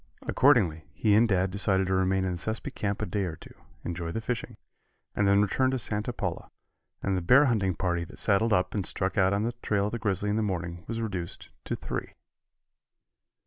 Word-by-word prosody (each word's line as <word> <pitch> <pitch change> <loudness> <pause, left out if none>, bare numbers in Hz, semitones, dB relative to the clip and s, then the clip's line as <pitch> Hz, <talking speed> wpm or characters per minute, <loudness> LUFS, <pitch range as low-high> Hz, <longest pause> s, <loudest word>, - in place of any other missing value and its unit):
Accordingly, 100 - +3
he 105 +5 +2
and 115 +2 +5
Dad 95 -1 +2
decided 95 -1 +1
to 95 - -1
remain 95 0 +2
in 95 - -1
the 90 - -3
Sespe 110 +5 -3
camp 100 -1 -2
a - - 0
day 100 -2 -1
or 80 -3 -4
two, - - -14 0.3
enjoy 85 -1 -3
the 115 - -2
fishing, 115 +1 -4 0.6
and 100 - +2
then 100 +1 +5
return 130 +6 +1
to 130 - 0
Santa 105 -1 -1
Paula, 90 -7 -4 0.5
and 100 - +1
the 90 - -1
bear 125 +12 +6
hunting 100 - +1
party 85 -1 -1
that - - -13
saddled 110 +2 +2
up 90 -2 +2
and 100 - -1
struck 95 +1 0
out 95 -1 +3
on 100 +1 +1
the 115 - 0
trail 100 -1 +1
of 105 - -2
the 120 - -3
grizzly 105 -1 0
in 105 - 0
the - - +1
morning 85 -4 -3
was 115 0 -3
reduced 95 -6 -4 0.2
to - - -2
three. - - -5
100 Hz, 215 wpm, -28 LUFS, 90-110 Hz, 0.6 s, bear